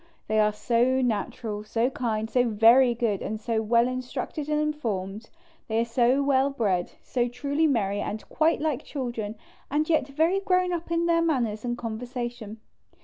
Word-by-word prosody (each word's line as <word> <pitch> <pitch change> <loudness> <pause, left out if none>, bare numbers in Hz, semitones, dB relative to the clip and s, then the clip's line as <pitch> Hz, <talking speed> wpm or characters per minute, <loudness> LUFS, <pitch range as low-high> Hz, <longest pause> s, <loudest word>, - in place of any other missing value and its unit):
They 215 0 +1
are 210 0 +4
so 240 +4 +1
natural, 220 -2 -2
so 230 +4 0
kind, 220 -4 -2
so 245 +2 +2
very 235 +3 +5
good 225 -4 -1
and 215 0 -4
so 225 0 -1
well 235 +2 +3
instructed 255 +4 -4
and 300 0 +1
informed; 225 -9 -3 0.4
they 220 0 0
are 230 - +2
so 245 +3 +2
well 275 0 +3
bred, 200 -10 -1
so 245 -1 0
truly 285 +6 0
merry 205 -7 0
and 215 +1 -5
quite 320 +1 +2
like 300 -4 -1
children 235 -6 -4 0.3
and 300 +2 0
yet 315 -5 +2
very 320 +7 +1
grown 365 -2 +1
up 340 -1 -4
in 335 0 +1
their 335 0 +3
manners 240 -10 0
and 240 -1 -2
conversation. 240 -1 -5
245 Hz, 170 wpm, -26 LUFS, 220-280 Hz, 0.4 s, very